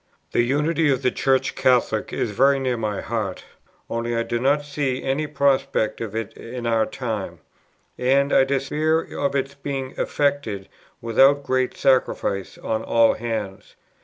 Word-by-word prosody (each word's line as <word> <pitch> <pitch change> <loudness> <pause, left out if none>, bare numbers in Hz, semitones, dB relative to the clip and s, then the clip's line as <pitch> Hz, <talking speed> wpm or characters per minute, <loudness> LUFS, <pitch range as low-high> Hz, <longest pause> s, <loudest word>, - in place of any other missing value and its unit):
The - - +3
unity 150 +5 +1
of 135 -1 +1
the 125 - +3
Church 135 -1 +1
Catholic 120 -4 +1
is 110 - -2
very 135 +6 +4
near 130 -2 -1
my 105 -3 -2
heart, 110 -5 -4 0.4
only 115 0 -2
I 115 - +1
do 120 0 -2
not 140 +4 +2
see 140 -3 -2
any 140 +3 -1
prospect 135 -6 +1
of 110 -2 -5
it 110 -2 -3
in 120 +1 -7
our 115 -1 +2
time; 110 -6 -4 0.6
and 140 +3 +2
I - - +6
despair 150 +4 +1
of 140 -3 -3
its 135 0 -1
being 135 -2 -5
effected 140 -9 -1 0.3
without 135 +5 +4
great 130 -1 0
sacrifices 100 -7 +1
on 110 0 -1
all 115 -1 +4
hands. 110 -4 -5
130 Hz, 155 wpm, -23 LUFS, 115-140 Hz, 0.6 s, I